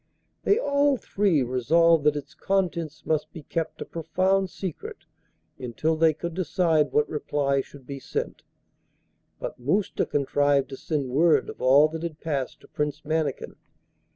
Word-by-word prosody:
They 405 - +4
all 285 - +2
three 195 - +1
resolved 155 +6 +3
that 150 -1 +4
its 145 - -6
contents 170 -5 -2
must 155 -1 -1
be 160 - -10
kept 165 +2 -4
a - - -15
profound 185 +4 0
secret 185 -2 -7 0.5
until 130 +6 -1
they 160 0 +4
could 170 +2 -5
decide 160 -4 +1
what 150 +2 +2
reply 140 -2 0
should 135 0 -14
be 140 0 -6
sent, - - -4 1.0
but - - -6
Mousta 185 +11 0
contrived 145 -1 +1
to 135 - -6
send 145 -5 -2
word 150 0 +3
of - - -14
all 135 +4 +6
that 160 0 -6
had 165 -3 -5
passed 140 -5 -3
to - - -17
Prince 150 -1 -3
Mannikin. 155 -3 -2
155 Hz, 155 wpm, -26 LUFS, 140-170 Hz, 1.0 s, all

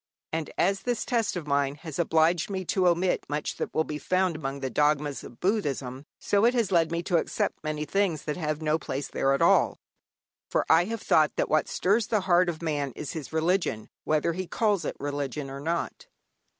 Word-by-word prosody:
And 160 -2 -2
as 195 +2 +2
this 245 -2 -1
test 230 -5 0
of 175 -4 -4
mine 140 -1 +1
has 160 +1 -8
obliged 165 +1 +2
me 190 -2 -3
to 185 +1 +2
omit 175 +1 +2
much 145 0 -3
that - - -3
will 160 - +1
be 150 -1 -5
found 185 0 +1
among 140 -2 -4
the 135 -1 -3
dogmas 150 -1 +1
of 120 - -12
Buddhism, 140 - -1
so 205 0 +1
it 240 +2 +4
has 230 -5 +1
led 165 -3 +3
me 170 0 -1
to 175 -1 +2
accept - - -2
many 155 0 -2
things 180 -2 0
that 150 - -3
have 155 -2 -3
no 155 +1 +1
place 140 -1 -4
there 135 - 0
at 135 - +2
all. - - +4 0.7
For - - +1
I 165 +2 +5
have 225 +1 -5
thought 155 -1 +3
that - - 0
what 155 -1 +2
stirs 205 +4 +1
the 215 -3 +1
heart 180 -1 +3
of 170 -1 -5
man 145 -5 -1
is 150 - -5
his 155 -5 -6
religion, 160 - 0
whether 155 +2 +1
he 185 +1 -4
calls 210 -3 +1
it - - -4
religion 140 -1 -3
or 135 - -6
not. 165 +4 -3
160 Hz, 210 wpm, -27 LUFS, 145-185 Hz, 0.7 s, I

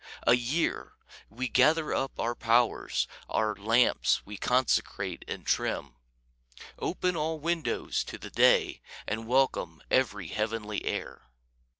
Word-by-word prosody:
A - - +6
year! 130 +7 -1 0.4
We 125 +5 -3
gather 155 +5 +3
up 135 0 -2
our 120 +1 0
powers, 115 0 +1 0.2
Our 110 -1 +1
lamps 105 - +2
we 105 - -8
consecrate 125 +4 0
and - - -6
trim; 70 -3 -1 0.9
Open 180 0 -1
all 160 0 -1
windows 165 +1 -1
to - - -7
the - - -10
day, - - +3 0.2
And 110 +1 -3
welcome 125 -10 +1
every 105 -9 +1
heavenly 105 0 -2
air. - - -4
120 Hz, 120 wpm, -29 LUFS, 105-135 Hz, 0.9 s, A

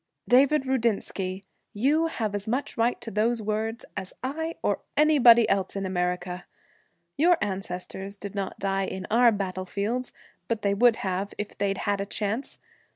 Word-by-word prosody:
'David 270 +3 +5
Rudinsky, 205 -6 -1 0.3
you 295 +9 +2
have 220 -10 -3
as 205 0 -4
much 255 +6 -1
a 230 - -1
right 235 +2 +2
to 225 - -6
those 225 +4 +1
words 220 +2 -2
as 185 - -6
I 320 +5 -3
or - - +1 0.2
anybody 255 -7 +7
else 195 -1 0
in 195 -1 -2
America. 180 0 -2 0.7
Your 345 +3 +5
ancestors 195 0 -4
did 200 -1 -7
not 195 -2 -4
die 195 -1 -1
on 190 0 -5
our 235 +1 +6
battlefields, 200 +5 -2 0.4
but 230 -2 -2
they 200 -1 +2
would 235 +3 +5
have 190 +2 -2
if 210 - -5
they'd 195 -1 -1
had 205 -1 -1
a 200 - -4
chance. 215 +5 -3
210 Hz, 160 wpm, -26 LUFS, 195-240 Hz, 0.7 s, anybody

